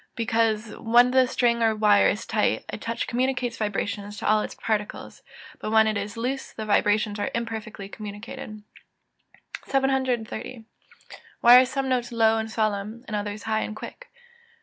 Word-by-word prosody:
_ - - -46
Because 225 -1 0
when 240 +2 +4
the 260 0 +4
string 235 -2 +1
or 225 -1 +3
wire 210 -1 +4
is 210 - -3
tight, 215 - 0
a - - -4
touch 230 +2 -3
communicates 250 -1 -1
vibrations 205 -1 -3
to - - -4
all 215 0 +4
its - - -6
particles; 210 -2 -4 0.4
but - - -4
when 220 0 +5
it 215 0 0
is 205 +1 -4
loose 260 +4 -3
the 220 - -6
vibrations 210 0 +1
are - - -1
imperfectly 220 -3 -5
communicated. 210 0 -8 1.0
730. 255 -3 -1 0.8
_Why 245 +1 +9
are - - +2
some 270 0 -2
notes 250 -1 -1
low 225 -1 +3
and 220 0 -4
solemn, 215 +1 -2
and 215 - -4
others 205 0 -4
high 220 0 0
and 215 - -4
quick? - - -10
220 Hz, 165 wpm, -25 LUFS, 210-240 Hz, 1.0 s, Why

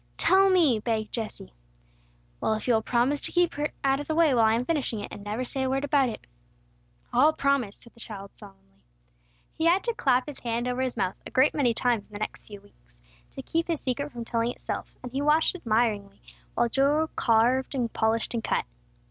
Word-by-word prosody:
"Tell 390 +1 +4
me!" 320 - +4
begged 215 -1 -2
Jesse. 215 - -5 0.9
"Well, 220 - +1
if 215 - -6
you 245 - +4
will 220 - +3
promise 255 +5 +1
to - - -1
keep 350 -1 +2
her 295 +1 -2
out 270 0 +2
of 290 - -6
the 315 - -1
way 325 -4 +4
while 230 -3 +4
I 220 - +3
am 240 +2 -1
finishing 280 -8 -1
it, 205 - -6
and 200 - -9
never 210 +4 -3
say 265 +2 -3
a 260 - 0
word 270 +1 0
about 280 -3 +2
it 220 - -8 0.4
" 120 - -37
"I'll 285 +6 +5
promise," 275 -9 0
said 235 - -16
the - - -20
child, 200 -3 -9
solemnly. 100 - -16 0.7
He 320 - -2
had 350 +3 +4
to 470 - -1
clap 260 - +2
his 295 -2 -8
hand 235 +1 -2
over 250 +1 -1
his 255 -2 -2
mouth 190 -2 -1
a - - -9
great 260 +3 +3
many 250 -6 +1
times 235 -5 0
in - - -22
the 205 - -6
next 215 - -6
few 205 -2 -10
weeks, 205 - -26 0.4
to 270 - -6
keep 330 +3 -1
his 330 -3 -1
secret 280 +3 -3
from 235 -1 -7
telling 230 0 0
itself, - - -6
and 250 - -7
he 270 +2 -2
watched 300 +2 +3
admiringly 220 - -1 0.4
while - - +2
Joel 285 +6 +2
carved 245 +4 +2
and 240 -4 -1
polished 220 +1 0
and 230 -2 -2
cut. - - 0
245 Hz, 225 wpm, -27 LUFS, 220-285 Hz, 0.9 s, I'll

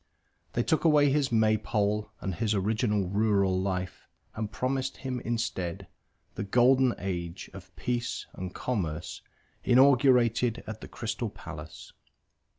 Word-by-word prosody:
They 120 - +1
took 160 - +1
away 150 -3 +5
his 140 -2 +1
maypole 110 -1 +1
and 95 - -2
his 105 +4 0
original 105 0 +1
rural 100 -2 +2
life 95 -1 -3 0.3
and 110 -1 -4
promised 135 +1 -2
him 130 -2 -4
instead 110 -7 -3 0.5
the - - -4
Golden 125 +4 +4
Age 85 -3 -5
of - - -11
Peace 120 -1 -2
and 90 0 -6
Commerce 85 -9 -3 0.4
inaugurated 125 -2 +4
at 110 -1 -7
the - - -8
Crystal 115 0 -4
Palace. - - -10
110 Hz, 125 wpm, -28 LUFS, 95-125 Hz, 0.5 s, away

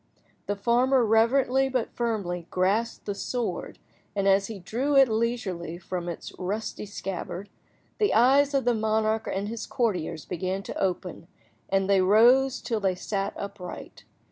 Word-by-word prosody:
The 205 - 0
farmer 245 +4 +3
reverently 255 +4 +3
but 255 -3 -1
firmly 195 -8 -2
grasped 205 +6 0
the 205 - -2
sword, 240 +4 -3 0.4
and 200 -1 +1
as 195 0 +4
he 220 - -6
drew 245 +10 -1
it 270 -1 +7
leisurely 220 -7 -2
from 175 -1 -5
its 170 - -7
rusty 205 +3 -4
scabbard, 195 -1 -5 0.5
the 420 - +3
eyes 275 +5 +5
of 270 - +1
the 245 - +3
monarch 220 0 0
and 195 +1 -2
his 230 +1 -5
courtiers 175 - -1
began 185 +2 -3
to - - -6
open, 180 -2 -3 0.4
and 195 0 +1
they 195 -1 +4
rose 245 +7 +5
till 225 -2 -2
they 190 -3 +1
sat 195 +2 -3
upright. 200 -3 -8
210 Hz, 150 wpm, -26 LUFS, 190-240 Hz, 0.5 s, it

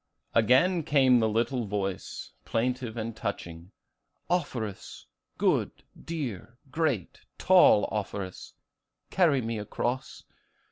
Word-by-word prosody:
Again 130 - +4
came 135 -4 +4
the 110 -1 +2
little 115 +1 0
voice, 95 -1 -4
plaintive 120 - -2
and 115 0 -4
touching, 85 -5 -5 0.6
'Offerus, 125 - -3 0.3
good, - - +2 0.3
dear, 120 - -5
great, 145 - -1 0.2
tall 180 - +5
Offerus, 100 -3 -5 0.6
carry 160 -8 +3
me 115 -1 -3
across. 120 +5 -4
115 Hz, 95 wpm, -28 LUFS, 105-135 Hz, 0.6 s, tall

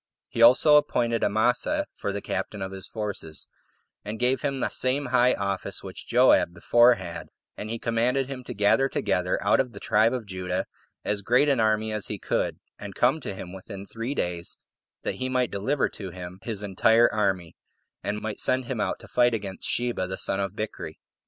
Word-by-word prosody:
He 115 - -3
also 130 +6 +8
appointed 115 -5 +1
Amasa 125 - +1
for 100 - -3
the 100 0 -5
captain 95 +1 -3
of 95 - -5
his 95 -1 -8
forces, 100 -8 -5 0.6
and 105 +2 -5
gave 125 +2 +1
him 140 -2 -1
the - - 0
same 135 +3 0
high 125 0 +5
office 100 -1 -3
which - - -9
Joab 85 - +4
before 120 +3 +5
had; 90 -5 -7 0.3
and 105 - -6
he 115 - -2
commanded 120 +4 +1
him 135 -2 -7
to - - -6
gather 105 +7 +3
together, 90 -7 0
out 100 - +4
of 125 -3 0
the - - -8
tribe 110 +2 +3
of 125 -3 -3
Judah, 95 -2 -3 0.4
as 105 -1 -1
great 125 +8 +3
an 140 -4 +2
army 110 0 +2
as 105 -2 -1
he - - -4
could, - - -1 0.2
and 100 -2 -8
come 130 +6 +3
to 100 -9 -6
him 90 -1 -8
within 95 +1 -8
three 115 +6 -5
days, 85 -1 -3 0.5
that - - -3
he 130 - -1
might 125 -1 0
deliver 130 +8 0
to 95 -3 -8
him 90 +1 -9
his 105 -3 -5
entire 110 +4 +4
army, 95 -6 -1 0.5
and 105 +1 -3
might 110 -1 -4
send 130 0 +1
him 120 -2 -4 0.2
to - - -13
fight 120 -1 +3
against 100 -3 -5
[Sheba] 120 -6 -1
the 95 - -5
son 95 - 0
of 100 0 -2
Bichri. 110 0 -5
110 Hz, 195 wpm, -26 LUFS, 95-125 Hz, 0.6 s, also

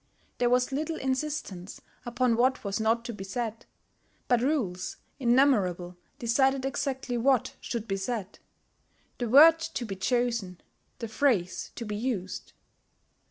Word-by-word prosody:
There 245 -1 +3
was 250 +2 +2
little 310 +4 -2
insistence 260 - -3 0.3
upon 240 0 +2
what 255 +3 +2
was 200 +1 -2
not 225 +2 +1
to 240 - -4
be 200 -2 -7
said; 225 +3 -4 0.6
but 245 -2 +3
rules 235 -11 -1 0.2
innumerable 220 -9 +2 0.2
decided 265 +2 +2
exactly 265 -2 -2
what 260 0 +2
should 230 -2 -4
be 195 - -1
said, 200 -1 -4 0.8
the 240 -2 -1
word 320 +6 +8
to 325 -6 -4
be 195 -3 -5
chosen, 230 -4 -1 0.4
the 230 - -5
phrase 220 -6 0
to 235 - -5
be 210 -1 -4
used. 210 -5 -3
240 Hz, 135 wpm, -28 LUFS, 205-265 Hz, 0.8 s, word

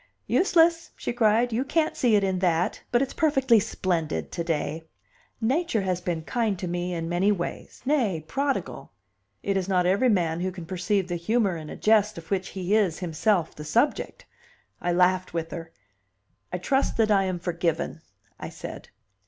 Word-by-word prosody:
"Useless!" 335 -2 +3
she - - -4
cried, 230 +1 +3
"you 240 +4 +1
can't 315 +3 0
see 235 -4 +3
it 205 - +3
in 190 -1 0
that. 175 -2 +1
But 240 +2 +3
it's 270 - -5
perfectly 270 -7 +3
splendid 165 - -2
to 170 - -3
day." 160 0 -2 0.5
Nature 245 - +1
has 180 -1 -1
been 175 -3 -2
kind 220 +1 -1
to 180 0 -4
me 175 +1 -2
in 165 -2 -3
many 175 +4 +2
ways 175 -4 -5
nay, 230 - +1
prodigal; 275 - -2 0.5
it 200 - 0
is 190 0 -1
not 180 -2 +2
every 200 +8 +3
man 170 -6 +1
who 185 +1 -1
can 175 -2 -8
perceive 185 +2 -1
the 175 -1 -2
humor 200 +2 +1
in 155 -2 -7
a - - -6
jest 215 -2 +3
of 165 +1 -10
which 190 -1 0
he 190 +3 +1
is 190 -7 +2
himself 175 +1 0
the 150 - -9
subject. 235 - 0 0.6
I 175 - 0
laughed 180 0 +2
with 165 -1 -2
her. 165 -1 -7 0.8
"I 180 - -1
trust 270 +9 0
that 220 -1 +3
I 195 -2 +4
am 185 -1 -1
forgiven," 170 -1 -2 0.4
I - - -6
said. - - -9
185 Hz, 180 wpm, -26 LUFS, 170-225 Hz, 0.8 s, I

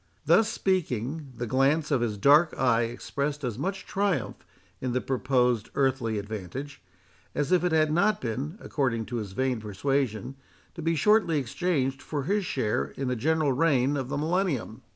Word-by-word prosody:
Thus 225 0 +4
speaking, 150 - -1
the 120 - -2
glance 140 +6 +2
of 135 -4 +2
his 110 -3 -1
dark 145 +9 +5
eye 120 -3 +3
expressed 140 +5 -3
as 120 -2 -3
much 195 +7 -3
triumph 190 - -1 0.4
in 125 -2 -2
the 125 - +2
proposed 125 -3 +1
earthly 130 -5 +1
advantage, 110 +8 -6 0.5
as 145 +3 -1
if 180 -2 +4
it 180 - +1
had 155 -1 +3
not 200 +6 +2
been, 135 - -4
according 115 -6 -1
to 120 +2 -4
his 105 -4 -5
vain 130 +1 0
persuasion, 115 +3 -2 0.4
to 170 - -7
be 165 +1 +1
shortly 200 0 +3
exchanged 135 0 -1
for 145 -3 -3
his 200 +5 0
share 105 - 0
in 135 -1 -2
the 125 - 0
general 155 +3 +1
reign 140 -2 +2
of 130 -2 -3
the - - -2
Millennium. 155 - -1
135 Hz, 170 wpm, -27 LUFS, 120-160 Hz, 0.5 s, dark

